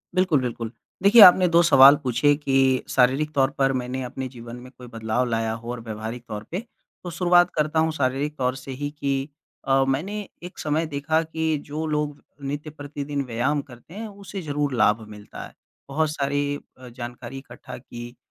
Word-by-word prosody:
बिल्कुल, 180 Hz, -7 st, +3 dB
बिल्कुल। 115 Hz, -2 st, -4 dB, 0.3 s
देखिए, 210 Hz, +4 st, +8 dB
आपने 180 Hz, -1 st, +9 dB
2 170 Hz, 0 st, +5 dB
सवाल 140 Hz, -3 st, +8 dB
पूछे 130 Hz, +3 st, +3 dB
कि 135 Hz, -3 st, +2 dB
शारीरिक 135 Hz, +4 st, +2 dB
तौर 135 Hz, -2 st, +3 dB
पर 135 Hz, -1 st, +2 dB
मैंने 125 Hz, +1 st, -3 dB
अपने 130 Hz, +1 st, -5 dB
जीवन 120 Hz, -2 st, -10 dB
में 125 Hz, +1 st, -12 dB
कोई 125 Hz, -1 st, -11 dB
बदलाव 115 Hz, +1 st, -1 dB
लाया 115 Hz, -1 st, 0 dB
हो 115 Hz, +1 st, -6 dB
और 125 Hz, -, -5 dB
व्यावहारिक 110 Hz, +2 st, -6 dB
तौर 105 Hz, 0 st, -6 dB
पे। 180 Hz, -, -2 dB, 0.4 s
तो 180 Hz, -, -5 dB
शुरुआत 175 Hz, 0 st, +4 dB
करता 155 Hz, +1 st, +1 dB
हूँ 160 Hz, 0 st, +2 dB
शारीरिक 140 Hz, 0 st, -1 dB
तौर 130 Hz, 0 st, 0 dB
से 135 Hz, +1 st, -8 dB
ही 145 Hz, +2 st, -4 dB
कि 135 Hz, 0 st, -1 dB, 0.4 s
अ, 135 Hz, 0 st, +4 dB
मैंने 150 Hz, +10 st, -1 dB, 0.3 s
एक 180 Hz, -, -9 dB
समय 155 Hz, +2 st, 0 dB
देखा 150 Hz, +2 st, 0 dB
कि 160 Hz, -1 st, -1 dB
जो 155 Hz, +2 st, -4 dB
लोग 150 Hz, -1 st, -2 dB, 0.2 s
नित्य 145 Hz, +2 st, -4 dB
प्रतिदिन 145 Hz, -1 st, -5 dB
व्यायाम 130 Hz, +5 st, 0 dB
करते 130 Hz, +4 st, -15 dB
हैं, 220 Hz, +2 st, -6 dB
उसे 200 Hz, -1 st, -8 dB
ज़रूर 145 Hz, -3 st, -2 dB
लाभ 110 Hz, -2 st, +3 dB
मिलता 105 Hz, -1 st, -10 dB
है। -, -, -14 dB, 0.4 s
बहुत 155 Hz, +2 st, 0 dB
सारी 145 Hz, 0 st, -1 dB, 0.2 s
अ, 130 Hz, 0 st, -12 dB
जानकारी 120 Hz, +1 st, -8 dB
इकट्ठा 125 Hz, -3 st, -10 dB
की 120 Hz, -1 st, -10 dB
140 Hz, 185 wpm, -24 LUFS, 125-155 Hz, 0.4 s, आपने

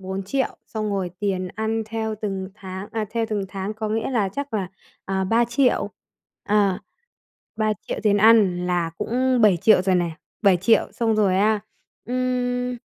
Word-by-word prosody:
4.000.000, 195 Hz, +8 st, -2 dB
xong 215 Hz, -2 st, -3 dB
rồi 190 Hz, -3 st, -2 dB
tiền 190 Hz, -3 st, -1 dB
ăn 220 Hz, +1 st, -1 dB
theo 220 Hz, 0 st, -3 dB
từng 195 Hz, -2 st, -3 dB
tháng, 190 Hz, -1 st, -8 dB
à, 220 Hz, -1 st, -1 dB
theo 230 Hz, -1 st, -1 dB
từng 210 Hz, -3 st, -1 dB
tháng, 195 Hz, +2 st, -4 dB
có 215 Hz, 0 st, -3 dB
nghĩa 220 Hz, +3 st, -1 dB
là, 220 Hz, -6 st, +1 dB
chắc 280 Hz, +6 st, -5 dB
là, 195 Hz, -4 st, -1 dB, 0.4 s
à, 190 Hz, 0 st, -1 dB
3.000.000, 235 Hz, +5 st, +2 dB, 0.5 s
à, 200 Hz, -3 st, +2 dB, 0.8 s
3.000.000 215 Hz, -2 st, -2 dB
tiền 205 Hz, -1 st, +4 dB
ăn, 205 Hz, -5 st, +5 dB
là 175 Hz, -2 st, 0 dB
cũng 255 Hz, +1 st, +1 dB
7.000.000 205 Hz, -1 st, +5 dB
rồi 185 Hz, -1 st, +2 dB
này. 175 Hz, -2 st, 0 dB, 0.3 s
7.000.000, 200 Hz, +2 st, +4 dB
xong 225 Hz, -2 st, +1 dB
rồi, 200 Hz, -3 st, +3 dB
a, 210 Hz, +2 st, +3 dB, 0.5 s
ừm, 250 Hz, 0 st, -1 dB
210 Hz, 155 wpm, -23 LUFS, 190-225 Hz, 0.8 s, ăn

